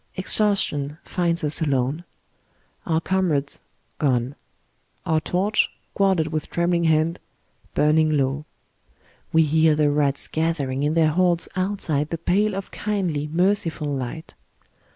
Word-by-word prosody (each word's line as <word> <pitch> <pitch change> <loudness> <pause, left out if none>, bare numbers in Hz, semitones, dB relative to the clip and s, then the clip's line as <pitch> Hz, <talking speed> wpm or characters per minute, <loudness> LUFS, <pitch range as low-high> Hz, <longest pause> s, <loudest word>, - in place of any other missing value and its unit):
Exhaustion 185 -7 +1
finds 170 -2 -1
us 150 +2 0
alone. 140 +2 0 0.8
Our 160 -2 +2
comrades 165 -6 0 0.4
gone. 130 -2 +1 0.7
Our 160 -1 +1
torch, 195 +6 +1 0.3
guarded 190 -5 +2
with 155 0 -3
trembling 170 0 +1
hand, 160 +2 +2 0.6
burning 155 +1 +3
low. 135 +2 -1 0.9
We 160 0 +5
hear 155 0 +3
the 150 -1 +2
rats 145 -1 0
gathering 155 -5 -1
in 150 +2 0
their 160 -2 +4
hordes 175 0 +2
outside 185 -6 -1
the 165 - -3
pale 195 +5 +1
of 195 0 -6
Icindly, 180 -8 -2
merciful 170 -4 0
light. 135 +4 -5
160 Hz, 120 wpm, -23 LUFS, 145-180 Hz, 0.9 s, We